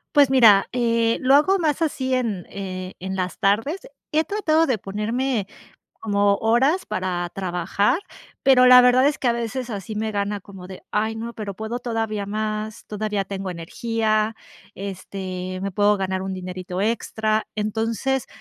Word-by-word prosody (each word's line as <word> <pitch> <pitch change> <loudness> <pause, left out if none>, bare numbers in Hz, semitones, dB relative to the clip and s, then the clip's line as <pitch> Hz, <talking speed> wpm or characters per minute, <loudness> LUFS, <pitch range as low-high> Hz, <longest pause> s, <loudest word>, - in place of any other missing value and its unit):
Pues 285 -2 +6
mira, 225 -7 +6
eh, 230 -2 +1
lo 265 +2 +4
hago 375 +7 +4
más 315 0 0
así 260 -4 -1
en, 225 -8 -1
eh, 185 -2 -6
en 190 +1 -4
las 185 -1 -3
tardes. 225 - +1 0.3
He 310 +1 +3
tratado 330 -5 +2
de 255 -6 +1
ponerme 215 +4 -2 0.6
como 200 -2 +2
horas 265 - +2
para 180 -1 -2
trabajar, 190 - 0 0.4
pero 260 -2 +6
la 250 0 +9
verdad, 250 +2 +5
es 295 - -1
que 250 - 0
a - - +4
veces 235 +2 -3
así 205 0 -5
me 215 0 -2
gana 200 0 -2
como 190 -1 -11
de: 190 0 -10
"Ay, 220 +1 0
no, 230 +1 -5
pero 210 -3 -6
puedo 220 +5 -4
todavía 225 -4 -2
más. 215 +1 -3
Todavía 210 -1 -2
tengo 195 -1 -5
energía. 215 +5 -1 0.4
Este 185 -1 -6
me 195 - -2
puedo 205 +2 +3
ganar 190 -1 -2
un 190 0 -4
dinerito 185 0 -5
extra". 220 0 0
Entonces, 225 +5 -1
215 Hz, 160 wpm, -23 LUFS, 195-245 Hz, 0.6 s, la